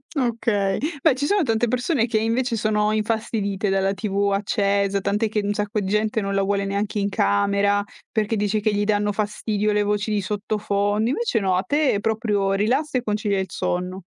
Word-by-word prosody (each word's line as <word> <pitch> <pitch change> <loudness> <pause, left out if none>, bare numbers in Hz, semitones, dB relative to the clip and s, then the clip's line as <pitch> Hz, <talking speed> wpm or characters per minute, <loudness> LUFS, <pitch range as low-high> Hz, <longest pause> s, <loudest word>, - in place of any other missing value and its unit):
Okay. 230 -6 0 0.2
Beh, 320 - +5
ci 275 +3 -2
sono 405 -1 +2
tante 230 -1 +1
persone 250 +1 +1
che 225 - 0
invece 230 +2 0
sono 215 0 +1
infastidite 215 -2 -1
dalla 195 0 +1
TV 200 0 -1
accesa, 200 -1 +1
tant'è 210 +3 0
che 210 -1 0
un 205 0 0
sacco 210 +1 -2
di 190 - -3
gente 215 +2 0
non 195 0 -2
la 195 - +2
vuole 200 0 0
neanche 200 +2 -2
in 200 0 0
camera 200 0 +2 0.3
perché 215 0 0
dice 210 +1 0
che 210 0 0
gli 205 0 0
danno 205 -1 +1
fastidio 210 0 -1
le 210 0 +2
voci 210 +1 -1
di 205 -1 +1
sottofondo. 205 +1 -1
Invece 415 - 0
no, 190 -3 +1
a 185 - +2
te 285 -2 +1
proprio 210 -3 0
rilassa 255 +8 +1
e 245 - -2
concilia 210 -2 0
il 190 -1 -3
sonno. 180 +2 -3
210 Hz, 190 wpm, -23 LUFS, 200-220 Hz, 0.3 s, Beh